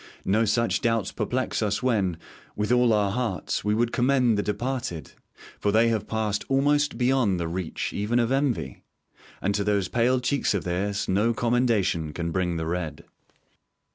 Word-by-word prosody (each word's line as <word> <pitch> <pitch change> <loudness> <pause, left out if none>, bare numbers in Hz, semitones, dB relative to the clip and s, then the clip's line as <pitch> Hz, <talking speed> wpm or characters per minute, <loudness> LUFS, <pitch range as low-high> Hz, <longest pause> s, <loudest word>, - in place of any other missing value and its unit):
No 110 +4 +2
such 115 +2 +1
doubts 115 -5 0
perplex 120 +4 -2
us 105 +2 -1
when, 100 -9 +1 0.4
with 105 +2 -1
all 125 -1 +4
our 105 -2 +2
hearts, 115 -5 -2
we 105 +1 +1
would 120 +1 +1
commend 125 -2 +2
the 105 - +1
departed; 105 - -3 0.5
for 105 - +1
they 115 +2 +4
have 110 -2 -1
passed 110 -2 -1
almost 145 +2 +2
beyond 125 -7 +2
the 85 - -2
reach 85 0 -4
even 105 +4 0
of 120 0 +1
envy; 135 - -1 0.6
and 100 - +1
to 100 0 0
those 100 -2 0
pale 125 +2 +2
cheeks 125 -3 0
of 100 - -1
theirs 100 +3 -2
no 105 +5 +1
commendation 110 -10 +1
can 85 +1 -3
bring 90 -1 -1
the 80 - -3
red. 80 -3 -4
105 Hz, 170 wpm, -25 LUFS, 95-120 Hz, 0.6 s, all